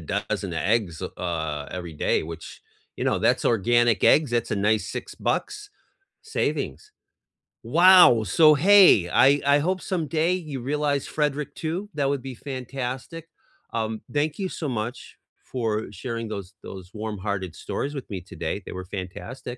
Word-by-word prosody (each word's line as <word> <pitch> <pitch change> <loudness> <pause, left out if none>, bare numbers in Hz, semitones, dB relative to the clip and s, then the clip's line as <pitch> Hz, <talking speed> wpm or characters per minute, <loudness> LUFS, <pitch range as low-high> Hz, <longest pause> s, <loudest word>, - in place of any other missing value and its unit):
dozen 100 +1 -3
eggs, 95 -1 0
uh, 80 -4 -4
every 85 -3 -6
day, 75 - 0
which, 80 +1 -9 0.3
you - - -3
know, - - +1
that's - - +2
organic 120 0 +3
eggs, 150 -3 +5
that's 120 -1 -1
a - - 0
nice 105 +2 +1
6 - - -6
bucks, 420 -1 -3 0.5
savings. 435 -1 -3 0.7
Wow! 175 -10 +7
So 155 - +5
hey, 180 - +6
I 140 +9 +4
I 140 +1 +5
hope 185 +5 -1
someday 165 -1 0
you 155 -7 -4
realize 145 +1 -1
Frederick 150 -1 -2
too, 175 +6 -4
that 140 -2 0
would 140 -2 -1
be 135 - -6
fantastic, 130 +4 -6 0.5
um, 110 -1 -2
thank 150 +3 -1
you 190 -2 -2
so 155 - -5
much 120 0 -5 0.3
for 110 -4 -2
sharing 115 +2 -5
those 100 -2 -6
those 95 -2 -9
warm-hearted 100 -4 -4
stories 145 - -4
with 135 -4 -7
me 95 -4 -5
today, - - -5
they - - -7
were 95 0 -6
fantastic. 95 +7 -7
120 Hz, 150 wpm, -25 LUFS, 100-150 Hz, 0.7 s, Wow